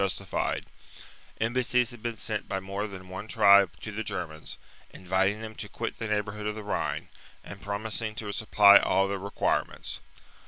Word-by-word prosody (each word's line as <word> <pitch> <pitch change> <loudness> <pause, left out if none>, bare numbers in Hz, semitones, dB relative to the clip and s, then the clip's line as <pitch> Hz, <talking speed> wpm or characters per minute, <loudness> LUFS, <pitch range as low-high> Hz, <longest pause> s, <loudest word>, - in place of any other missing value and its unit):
justified: 95 -2 -1 0.7
embassies 125 +1 +2
had 120 -2 -10
been 115 -1 -3
sent 105 -1 -2
by 95 - -1
more 100 +2 -4
than 95 -2 -10
one 95 +3 -7
tribe 100 -4 +6
to 105 - -6
the 110 +2 -3
Germans, 80 -6 -5 0.3
inviting 95 +3 0
them 110 0 -6
to - - -6
quit - - -5
the 115 - -2
neighbourhood 105 0 -2
of 105 - -2
the 110 - -6
Rhine, 100 - -2 0.3
and - - -10
pro 100 0 -2
mising 110 0 -3
to 105 -1 -4
supply 100 -1 +7
all 95 0 +2
their 100 0 -2
requirements. 100 +1 -1
105 Hz, 170 wpm, -28 LUFS, 100-110 Hz, 0.7 s, supply